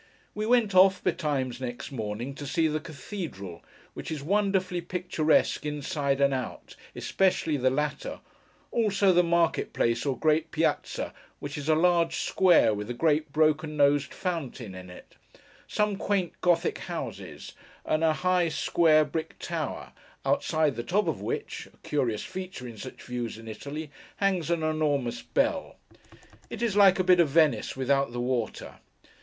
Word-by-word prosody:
We 215 +1 -3
went 235 -4 +3
off, 190 0 +5
betimes 130 -5 -1
next 120 +1 -5
morning, 115 +1 -4
to 145 +1 -7
see 165 +2 +2
the 155 0 -1
Cathedral, 140 - -7 0.3
which - - -7
is 155 -3 -4
wonderfully 190 0 +1
picturesque 175 -3 +1
inside 145 -1 -1
and 140 0 +3
out, 130 -1 -5 0.2
especially 180 -5 +1
the 130 -2 +2
latter—also 190 - -1
the 175 - +6
market 170 -1 +1
place, 115 0 +1
or 135 -3 -1
great 155 0 +2
Piazza, - - -1 0.3
which 145 0 -6
is 150 +1 -4
a 155 - +5
large 170 0 +3
square, 180 - +4
with 105 +2 -5
a 120 - -3
great 150 +1 +1
broken 155 0 +1
nosed 140 0 +3
fountain 140 - -4
in 90 0 -10
it: 90 - -14 0.5
some 210 -1 0
quaint 195 -4 -1
Gothic 175 -1 +2
houses: - - -6 0.3
and 155 +1 +1
a 160 - +5
high 180 0 +1
square 155 -1 +3
brick 160 +1 -5
tower; - - -4 0.3
outside 155 -3 +1
the - - -1
top 185 - 0
of 160 - -2
which—a - - -5
curious 120 -7 0
feature 185 -9 -7
in 115 - -9
such 130 - -9
views 120 -3 -4
in 115 0 -11
Italy—hangs 155 - -3
an 170 -2 0
enormous 150 -6 0
bell. - - -1 0.7
It 235 - -5
is 225 -4 0
like 195 -2 +6
a 185 - +2
bit 180 -1 +5
of 165 -4 +4
Venice, 145 -5 +2
without 135 0 +1
the 120 - -3
water. 120 -2 -3
155 Hz, 150 wpm, -27 LUFS, 135-180 Hz, 0.7 s, the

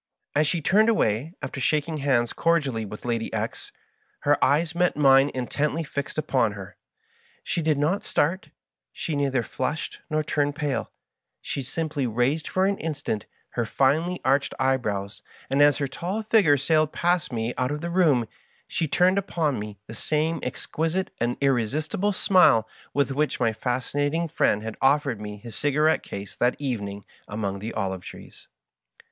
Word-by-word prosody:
As 150 +1 +3
she 170 +1 0
turned 215 +7 +4
away, 150 - +1
after - - -4
shaking 155 +3 0
hands 130 -5 +1
cordially 140 -10 +1
with 105 +3 -9
Lady 115 -2 -1
X^, - - -4 0.5
her 145 0 +2
eyes 155 +3 +2
met 175 -1 +1
mine 135 -1 +6
intently 145 +5 -1
fixed 140 -1 -5
upon - - +1
her. - - -9 0.7
She 175 - -1
did 155 -2 +2
not 155 +8 +1
start, 170 +6 0 0.4
she 155 - -4
neither 135 -3 +1
flushed 150 +6 -3
nor 155 0 0
turned 145 -1 0
pala; 145 -4 -2 0.5
she 140 - -4
simply 145 0 -2
raised 125 +7 0
for 185 0 +1
an 200 0 0
instant 145 -9 -3 0.2
her 120 - -1
finely 155 +10 +1
arched 135 +1 +2
eye 130 0 +3
brows, 100 -3 -4 0.3
and 140 +1 +3
as 145 -1 +6
her 140 -2 -1
tall 185 +10 -3
figure 210 -10 +4
sailed 155 +2 +2
past 175 -4 0
me 115 0 -2
out 125 0 0
of 150 +1 -3
the 170 0 -3
room, 150 -10 +3 0.4
she 160 - -1
turned 180 +7 +3
upon 160 - -1
me 105 -1 -7
the - - -9
same 155 +7 -1
exquisite 165 +4 -2
and 120 +1 0
irre 135 -3 +3
istible 155 - -1
smile 180 - +5 0.2
with* 140 -1 +1
which 150 +2 0
my 115 -2 +2
Fascinating 145 +7 -1
Friend 110 -9 +1
had 110 0 -6
offered 135 -4 +2
me 105 0 -6
his 115 +1 -10
cigarette 150 +2 +2
case 100 0 -8
that 125 +1 +2
evening 105 -8 -4 0.2
among 100 -2 -3
the 110 +3 -5
olive 95 -3 -2
trees. - - -12
145 Hz, 165 wpm, -25 LUFS, 120-160 Hz, 0.7 s, mine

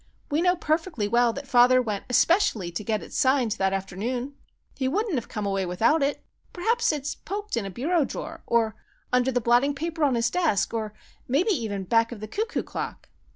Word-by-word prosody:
We 300 +3 +2
know 360 0 +3
perfectly 315 - -1
well 235 +2 +3
that 280 +3 -7
father 255 -1 +6
went 215 -5 -2
especially 250 - +2
to 175 +5 -4
get 215 -1 -1
it - - -12
signed 260 -4 +2
that 190 0 +2
afternoon. 215 +8 -3 0.4
He 265 - -1
wouldn't 410 - 0
have 245 -6 -2
come 210 -1 -4
away 195 -1 0
without 225 - +2
it. 280 +1 -1 0.3
Perhaps 455 +5 +1
it's 290 -1 -3
poked 410 -1 -5
in 220 -4 -2
a - - -5
bureau 300 - +1
drawer, - - -6
or 225 -2 +2 0.4
under 250 +1 +3
the 245 - +1
blotting 245 +5 +3
paper 325 +2 -3
on 275 -4 +3
his 235 0 +1
desk, 325 - +1
or 215 -2 -3 0.3
maybe 310 - +2
even 220 - -2
back 230 +4 +2
of 235 - -7
the 215 - -6
cuckoo 440 - -2
clock!" - - -6
250 Hz, 200 wpm, -26 LUFS, 215-310 Hz, 0.4 s, father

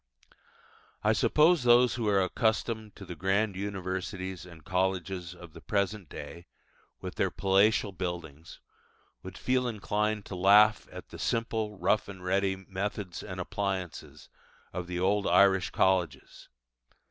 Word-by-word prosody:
I - - +4
suppose 160 +2 +4
those 120 0 +5
who 115 -3 -2
are 100 -2 +3
accustomed 110 +2 -1
to 100 - -10
the 90 - -7
grand 95 +4 0
universities 95 -1 -4
and 85 -3 -14
colleges 95 -1 -2
of 85 -2 -13
the 85 - -12
present 100 -4 -2
day, 75 +4 -9 0.5
with - - -6
their - - +2
palatial 100 +2 +2
buildings, 85 -4 -6 0.6
would 95 +1 -9
feel 125 0 0
inclined 105 -1 -1
to 95 - -7
laugh 105 +4 +5
at - - -10
the - - -10
simple, 110 -2 -2
rough 95 +4 +1
and 95 -2 -10
ready 95 +1 +1
methods 95 0 -5
and 95 -3 -7
appliances 95 -2 -4 0.5
of 90 -1 -4
the 90 0 -3
old 100 +2 +1
Irish 95 -1 +4
colleges. 95 -5 -1
95 Hz, 135 wpm, -29 LUFS, 90-105 Hz, 0.6 s, those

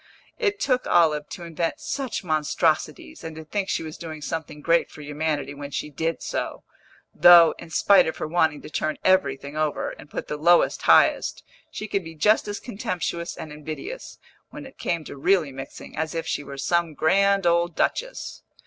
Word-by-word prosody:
It 410 -4 0
took 255 -7 0
Olive 150 -3 +3
to 175 - -8
invent 170 0 -3
such 270 -7 -3
monstrosities, 155 - -1
and 160 -1 -7
to 160 0 -9
think 195 +4 -3
she - - -1
was 155 -1 -8
doing 160 -2 -7
something 155 0 -5
great 165 +3 +2
for - - -12
humanity 145 -1 -2
when 140 0 -7
she 150 +1 -4
did 160 +3 -2
so; - - -4 0.5
though, 170 -2 +8
in 170 - -10
spite 195 +4 +5
of 160 - -3
her - - -3
wanting 160 -2 +1
to - - -9
turn 155 0 -1
everything 185 -6 +2
over, 155 -1 -1
and 145 - -13
put - - -5
the 150 - -4
lowest 170 +3 +4
highest, - - +4 0.3
she 215 - -6
could 200 -2 -1
be 165 0 -10
just 210 +7 +3
as 205 0 -4
contemptuous 185 -7 -4
and 155 - -7
invidious, 155 - -7 0.3
when 295 -1 -9
it 270 - -14
came 170 -2 -1
to - - -9
really 165 0 +2
mixing, 135 +1 -9
as 160 +1 -3
if 165 - -2
she - - -2
were 140 -1 -9
some 170 +2 0
grand 195 +5 +3
old 170 0 +2
duchess. - - -2
165 Hz, 185 wpm, -24 LUFS, 150-190 Hz, 0.5 s, though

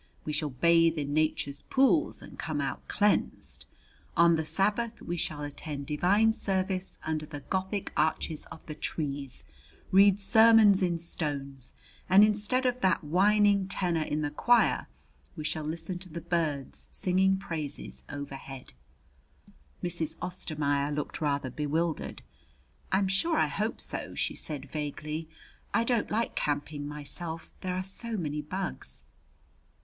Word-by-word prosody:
We 150 - -2
shall 150 0 -1
bathe 165 +4 +4
in 145 -1 -2
Nature's 150 -2 0
pools 275 +5 +2
and - - -12
come 155 -2 -2
out 135 -1 -3
cleansed. 210 0 0 0.5
On 170 0 +6
the 160 - 0
Sabbath 210 +7 +1
we 175 - -4
shall 150 -3 -3
attend 145 0 -5
divine 195 +9 +3
service 190 -2 0
under 155 -1 -2
the 145 -2 -7
Gothic 190 +5 -2
arches 155 0 0
of 160 - -12
the 155 - -6
trees, 140 -4 -4 0.5
read 195 +1 +6
sermons 220 -1 +6
in 175 -2 +1
stones, 140 -6 -4 0.4
and 195 +3 +8
instead 215 +5 +2
of 250 0 +1
that 185 -2 +2
whining 200 +4 +4
tenor 180 -4 0
in 155 0 -1
the 145 - -1
choir 240 +10 +3 0.5
we 155 - -5
shall 155 0 -2
listen 170 +3 -4
to 185 0 -10
the 170 +1 -5
birds 160 -5 -2
singing 190 +1 +2
praise, 160 -7 -4
overhead." 135 -2 -8 1.1
Mrs. 170 -3 -1
Ostermaier 150 -5 -1
looked 150 +2 -3
rather 140 -3 0
bewildered. 155 +4 -2 0.7
"I'm 190 +1 +3
sure 310 - +1
I - - +4
hope - - -2
so," - - -4
she - - -1
said 145 -3 -4
vaguely. 155 +2 -4 0.5
"I 230 - +4
don't 235 -2 +1
like 225 +2 0
camping 145 0 -2
myself. 160 +3 -5
There 185 -1 -2
are 185 - -1
so 220 +4 -1
many 150 -4 -2
bugs." 185 +6 -4
165 Hz, 140 wpm, -29 LUFS, 150-195 Hz, 1.1 s, and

